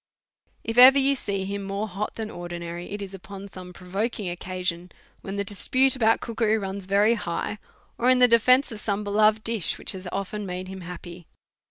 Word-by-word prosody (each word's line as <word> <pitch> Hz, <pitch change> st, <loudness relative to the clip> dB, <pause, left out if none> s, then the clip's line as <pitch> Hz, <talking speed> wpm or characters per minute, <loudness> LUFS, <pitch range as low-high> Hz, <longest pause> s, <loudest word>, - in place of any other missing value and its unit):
If 225 Hz, +1 st, -4 dB
you -, -, +10 dB
ever 270 Hz, +2 st, +7 dB
see 200 Hz, -7 st, -3 dB
him 200 Hz, +1 st, -4 dB
more 200 Hz, +2 st, -3 dB
hot 200 Hz, +2 st, -4 dB
than 220 Hz, -1 st, -5 dB
Ordinary, 175 Hz, 0 st, -7 dB
as 205 Hz, 0 st, -5 dB
is 195 Hz, -1 st, -9 dB
upon 195 Hz, +1 st, -9 dB
some 185 Hz, -2 st, -10 dB
provoking 190 Hz, +1 st, -3 dB
occa 185 Hz, 0 st, -6 dB
sion, 175 Hz, 0 st, -2 dB, 0.3 s
when 195 Hz, -, -6 dB
the 200 Hz, -, -1 dB
dispute 255 Hz, +7 st, +2 dB
about 225 Hz, -3 st, +2 dB
cookery 225 Hz, -1 st, 0 dB
runs 195 Hz, -1 st, -5 dB
very 205 Hz, +3 st, +4 dB
high, 210 Hz, -1 st, -3 dB, 0.4 s
or 245 Hz, -, +3 dB
in 255 Hz, -, +5 dB
the 250 Hz, 0 st, +6 dB
defence 250 Hz, +3 st, +4 dB
of 220 Hz, -, -6 dB
some 210 Hz, -1 st, -2 dB
beloved 215 Hz, +1 st, +3 dB
dish, 225 Hz, -6 st, 0 dB
which -, -, -3 dB
has 190 Hz, -1 st, -7 dB
of 195 Hz, +2 st, -4 dB
ten 210 Hz, -1 st, -4 dB
made 180 Hz, +1 st, -5 dB
him 190 Hz, 0 st, -8 dB
happy. 175 Hz, -1 st, -9 dB
200 Hz, 200 wpm, -25 LUFS, 185-220 Hz, 0.4 s, you